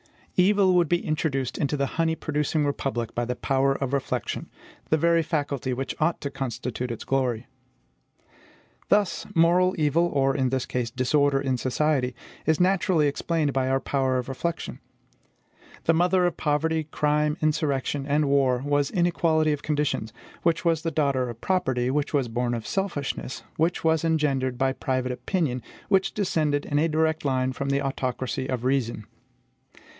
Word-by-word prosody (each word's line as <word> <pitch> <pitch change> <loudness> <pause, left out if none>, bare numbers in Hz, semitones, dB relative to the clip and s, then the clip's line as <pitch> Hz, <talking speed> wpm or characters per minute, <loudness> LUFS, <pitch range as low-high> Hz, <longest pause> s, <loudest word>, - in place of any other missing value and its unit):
Evil 190 0 +4
would 175 -3 +3
be 175 0 +1
introduced 145 -4 -1
into 145 0 0
the 140 - +1
honey 160 +3 0
producing 150 -1 -1
republic 135 -5 -2
by 120 - -1
the 125 +1 -2
power 135 +1 +1
of 135 -1 -3
reflection, 140 -1 -2 0.4
the 160 - +3
very 170 +1 +3
faculty 145 -5 -2
which 130 +1 -3
ought 160 +2 +1
to 140 - -4
constitute 125 -2 -4
its 115 - -5
glory. 125 -3 0 1.4
Thus, 205 -2 +2
moral 180 +3 +4
evil, 160 +2 +2
or, 135 -4 +1
in 130 -3 +1
this 130 -1 -1
case, 125 -2 -2
disorder 135 +3 +2
in 135 -2 0
society, 130 -1 0 0.3
is 160 -1 +3
naturally 180 -3 +3
explained 150 0 0
by 130 -1 +1
our 135 0 +2
power 130 -1 0
of 125 - -3
reflection. 165 +6 -4 1.0
The 165 - +3
mother 180 +2 +3
of 175 - -1
poverty, 155 +1 0
crime, 150 0 0
insurrection, 145 -3 0
and 150 +1 +2
war 135 -3 +2
was 145 -1 +1
inequality 165 -4 +2
of 145 - -4
conditions; 150 -7 -1 0.3
which 170 +1 +1
was 165 -2 +2
the 165 - -1
daughter 140 -5 0
of 115 -1 -9
property, 130 -10 0
which 145 +1 -1
was 135 -4 +1
born 120 +1 -1
of 115 -2 -5
selfishness, 170 -9 -3
which 165 +3 +1
was 160 -1 +2
engendered 140 -6 +1
by 135 +1 +1
private 130 -1 -1
opinion, 130 -1 -1 0.3
which 195 -1 +2
descended 155 -7 0
in 145 - 0
a 165 +2 +2
direct 160 0 +1
line 130 -2 0
from 140 +1 -3
the 140 +1 +1
autocracy 130 -1 -2
of 125 -2 -2
reason. 125 -5 0
145 Hz, 160 wpm, -25 LUFS, 130-160 Hz, 1.4 s, Evil